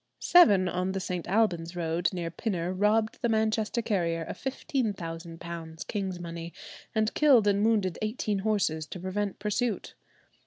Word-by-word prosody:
Seven 205 Hz, -, +6 dB
on 180 Hz, +1 st, -1 dB
the 195 Hz, -, -1 dB
St. 180 Hz, -2 st, -4 dB
Alban's 175 Hz, -4 st, +1 dB
road 170 Hz, 0 st, 0 dB
near 175 Hz, -3 st, -4 dB
Pinner 180 Hz, -2 st, -2 dB
robbed 215 Hz, +3 st, +1 dB
the 235 Hz, -, +1 dB
Manchester 220 Hz, +1 st, +1 dB
carrier 170 Hz, -6 st, 0 dB
of -, -, -6 dB
£15,000 170 Hz, -, -4 dB
king's 190 Hz, -4 st, -3 dB
money, 170 Hz, 0 st, -6 dB, 0.4 s
and 220 Hz, 0 st, +1 dB
killed 270 Hz, -8 st, +5 dB
and 200 Hz, 0 st, +3 dB
wounded 210 Hz, -5 st, +1 dB
eighteen 215 Hz, -2 st, -1 dB
horses 190 Hz, -7 st, 0 dB
to 180 Hz, -, -7 dB
prevent 195 Hz, +2 st, -2 dB
pursuit. 210 Hz, +2 st, -2 dB
195 Hz, 145 wpm, -28 LUFS, 170-220 Hz, 0.4 s, Seven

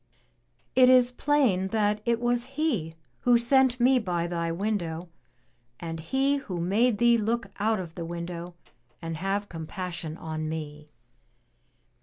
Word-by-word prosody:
"It 255 Hz, 0 st, +6 dB
is 250 Hz, -1 st, +6 dB
plain 250 Hz, -9 st, +2 dB
that 210 Hz, 0 st, 0 dB
it 235 Hz, -1 st, +1 dB
was 240 Hz, 0 st, 0 dB
He 220 Hz, -, 0 dB, 0.2 s
who 245 Hz, -1 st, +4 dB
sent 255 Hz, +1 st, +3 dB
me 255 Hz, +1 st, +5 dB
by 175 Hz, -6 st, -1 dB
thy 170 Hz, -1 st, -2 dB
window, 175 Hz, -3 st, -2 dB, 0.7 s
and 165 Hz, -1 st, -5 dB
He 270 Hz, -, +1 dB
who 185 Hz, -10 st, -5 dB
made 205 Hz, +7 st, +2 dB
thee 235 Hz, 0 st, +4 dB
look 230 Hz, +2 st, -1 dB
out 215 Hz, +1 st, +1 dB
of 170 Hz, -3 st, -7 dB
the 170 Hz, -, -6 dB
window 170 Hz, +1 st, -6 dB, 0.4 s
and 165 Hz, 0 st, -5 dB
have 195 Hz, +3 st, -1 dB
compassion 170 Hz, -1 st, -5 dB
on 155 Hz, -1 st, -4 dB
me." 150 Hz, -1 st, -6 dB
195 Hz, 140 wpm, -27 LUFS, 170-240 Hz, 0.7 s, It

